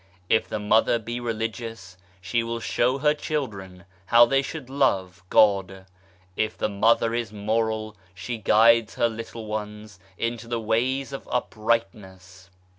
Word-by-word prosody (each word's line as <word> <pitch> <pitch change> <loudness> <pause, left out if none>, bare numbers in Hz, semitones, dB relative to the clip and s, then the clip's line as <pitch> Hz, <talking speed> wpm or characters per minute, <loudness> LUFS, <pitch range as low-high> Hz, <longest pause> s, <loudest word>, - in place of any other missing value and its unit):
If 110 - +2
the 110 - -3
Mother 110 +3 +3
be 115 +2 -5
religious 115 -4 -5 0.3
she 95 +6 0
will 115 0 -4
show 125 +3 0
her 150 +2 +3
children 100 - -5 0.2
how 120 +2 +7
they 135 +3 +2
should 140 -1 -7
love 95 -10 0
God. 95 -2 +3 0.5
If 110 - -1
the - - -1
Mother 115 +3 +2
is 120 -3 -2
moral 110 +1 -2 0.2
she 115 +6 -5
guides 110 +1 +4
her 120 - +2
little 115 0 -7
ones 105 -1 -6 0.2
into 115 0 -3
the 120 0 -2
ways 130 +5 -1
of 135 - -8
uprightness. 95 -6 -3
110 Hz, 140 wpm, -25 LUFS, 105-120 Hz, 0.5 s, how